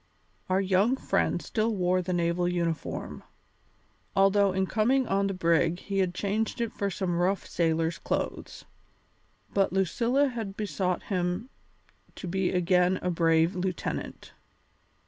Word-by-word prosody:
Our 185 +1 +3
young 195 +6 +3
friend - - 0
still 220 0 0
wore 185 -1 +1
the 180 - -4
naval 175 0 +1
uniform, 170 -3 -3 0.9
although 195 0 +4
in 190 +1 0
coming 240 +6 +2
on 195 +1 +1
the 195 - -2
brig 170 -1 +2
he 195 +1 -3
had 185 -2 0
changed 215 +5 -1
it 235 -2 -2
for 200 - -1
some 180 -2 -2
rough 190 +2 +1
sailor's 165 0 0
clothes. - - -4 0.9
But 195 -1 +2
Lucilla 240 - +2
had 220 -5 -5
besought 190 -4 -1
him 185 +5 -2 0.6
to - - -7
be 190 +1 0
again 180 0 +2
a 180 - 0
brave 165 0 +3
lieutenant. 185 -1 -4
185 Hz, 135 wpm, -28 LUFS, 175-200 Hz, 0.9 s, although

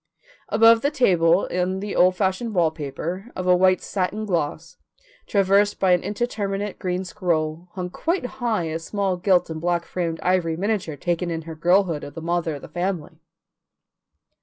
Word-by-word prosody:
Above 225 +1 +6
the 285 - +2
table 180 - +3
on 185 +1 0
the 205 0 -4
old 185 +1 +4
fashioned 195 +4 -1 0.2
paper, 165 - -5
of 185 - -4
a 180 0 +5
white 185 +1 +3
satin 205 +3 -2
gloss, 165 -2 -2 0.5
traversed 200 +1 +3
by 190 -1 +3
an 180 -1 +4
indeterminate 205 -3 -3
green 180 0 -2
scroll, 165 -3 -2
hung 180 -1 -4
quite 335 - -1 0.2
high 225 -7 +1
a 160 0 -3
small 195 +2 -1
gilt 180 0 +2
and 160 -1 -5
black 170 0 0
framed 165 -2 -3
ivory 175 -3 +1
miniature 195 -5 -1
taken 175 +3 -2
in 165 -1 -3
her 165 0 -7
girlhood 175 -1 +2
of 145 - -9
the - - -5
mother 170 -1 -1
of 140 - -10
the - - -8
family. 180 -2 -4
180 Hz, 165 wpm, -23 LUFS, 165-200 Hz, 0.5 s, Above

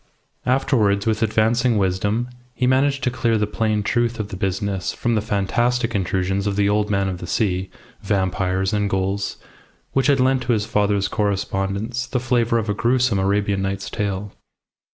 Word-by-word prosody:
Afterwards, 115 -6 +2
with 110 -1 0
advancing 110 +2 +2
wisdom, 100 +5 0 0.3
he 125 - 0
managed 135 +2 +2
to 125 - +1
clear 115 -2 +1
the 105 - +1
plain 105 0 -1
truth 120 +2 0
of 105 -1 -3
the - - -6
business 95 0 -2
from 120 - -1
the 110 - +1
fantastic 115 +3 0
intrusions 95 +1 0
of 100 - 0
the 100 0 +2
Old 105 +1 +1
Man 100 -1 +1
of 90 -2 -3
the 90 - -7
Sea, 95 -2 0 0.3
vampires, 95 0 0
and 105 -1 +1
ghouls, 95 +1 -1 0.5
which 135 +1 +1
had 140 -2 +4
lent 130 0 +3
to 120 0 +1
his 105 -2 0
father's 100 -2 +1
correspondence 100 +3 -2
the 125 - -1
flavour 120 -2 +1
of 115 -1 -1
a 105 - +1
gruesome 120 -1 +2
Arabian 100 0 +1
Nights 95 0 -3
tale. 100 -1 -3
105 Hz, 175 wpm, -21 LUFS, 95-120 Hz, 0.5 s, had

